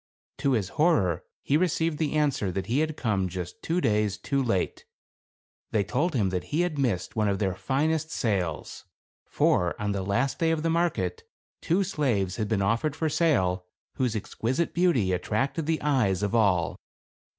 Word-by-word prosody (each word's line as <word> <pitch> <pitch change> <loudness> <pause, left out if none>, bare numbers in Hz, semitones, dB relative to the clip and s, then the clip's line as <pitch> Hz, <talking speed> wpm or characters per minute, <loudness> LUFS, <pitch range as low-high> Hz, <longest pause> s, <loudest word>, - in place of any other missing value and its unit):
To 140 - +2
his 100 -6 0
horror, 100 - +2 0.2
he 145 - +2
received 165 -2 0
the 155 -3 0
answer 145 -10 +1
that 95 +1 -2
he 125 +5 0
had 155 0 -1
come 100 -6 0
just 90 -1 -6
two 170 +2 0
days 105 - +1
too 140 +6 -1
late. 110 -8 -1 0.9
They 105 - +1
told 140 - -1
him 105 -6 +2
that 90 -1 -2
he 155 +3 0
had 175 -5 -1
missed 115 -10 -1
one 110 -2 +1
of 100 -1 +1
their 95 -2 0
finest 145 - 0
sales; 95 - -2 0.4
for, 90 +5 +1
on 105 -1 -1
the 100 -1 -1
last 100 +8 0
day 165 - +2
of 160 -1 0
the 165 - +1
market, 175 - 0 0.4
two 180 +4 +2
slaves 120 - 0
had 105 -3 -2
ueen 100 -3 +1
offered 115 +8 0
for 160 0 0
sale 95 - +1 0.3
whose 125 -4 0
exquisite 125 - -2
beauty 140 - +2
attracted 135 - -1
the 160 -1 +1
eyes 110 -10 +2
of 105 - -1
all. 95 -9 +2
115 Hz, 175 wpm, -27 LUFS, 100-155 Hz, 0.9 s, To